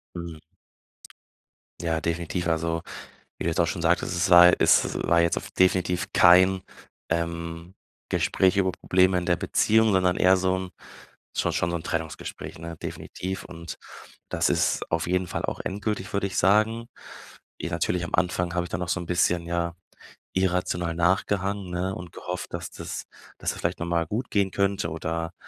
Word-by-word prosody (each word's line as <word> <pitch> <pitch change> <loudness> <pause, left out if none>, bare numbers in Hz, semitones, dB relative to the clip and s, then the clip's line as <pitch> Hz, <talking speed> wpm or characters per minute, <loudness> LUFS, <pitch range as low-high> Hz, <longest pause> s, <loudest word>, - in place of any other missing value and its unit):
Mhm. 85 -2 -7 1.4
Ja, 80 -2 -1
definitiv. 85 +2 -2
Also, 85 0 0 0.6
wie - - -4
du 85 - +1
jetzt 80 - 0
auch 85 - +4
schon 85 - -3
sagtest, 85 +2 +1
es 85 - +1
war 90 0 +9
es - - +4
war 85 0 +4
jetzt 85 0 +2
auf - - -5
definitiv 95 0 +2
kein, 95 +1 +6 0.5
ähm, 85 +1 -3 0.4
Gespräch 95 0 +2
über 95 -2 +2
Probleme 95 +1 +2
in 90 - -3
der 85 - +3
Beziehung, 110 +6 +3
sondern 90 -2 +3
eher 95 +1 +5
so 95 0 +1
'n 95 -1 -5 0.7
schon - - +1
schon 85 - 0
so 85 - -1
'n 85 - -6
Trennungsgespräch, 80 -1 -5
ne? 85 0 -7
Definitiv 95 +1 -5
und 85 -2 -8 0.5
das - - +1
ist - - 0
auf 85 0 0
jeden 90 +1 0
Fall - - -4
auch - - -3
endgültig, 100 0 -3
würde 100 0 0
ich 95 - -5
sagen. 110 +5 +3 0.7
I - - -2
natürlich 85 0 -1
am 85 - -8
Anfang 90 -1 0
habe 90 -1 0
ich 90 - -9
dann 85 - -3
noch 90 - -3
so 95 - 0
'n 85 - -7
bisschen, 85 -1 +1
ja, 85 0 -1 0.6
irrational 90 -2 0
nachgehangen, 95 +2 0
ne, 90 +2 -2
und 90 -1 -8
gehofft, 90 0 -6
dass - - -4
das - - -6 0.4
dass - - -1
das - - -9
vielleicht 85 +1 -2
noch 85 - -2
mal 85 -1 +1
gut 115 +7 -3
gehen 100 -2 +1
könnte 100 -4 0
oder 80 +1 -3
90 Hz, 175 wpm, -26 LUFS, 85-95 Hz, 1.4 s, war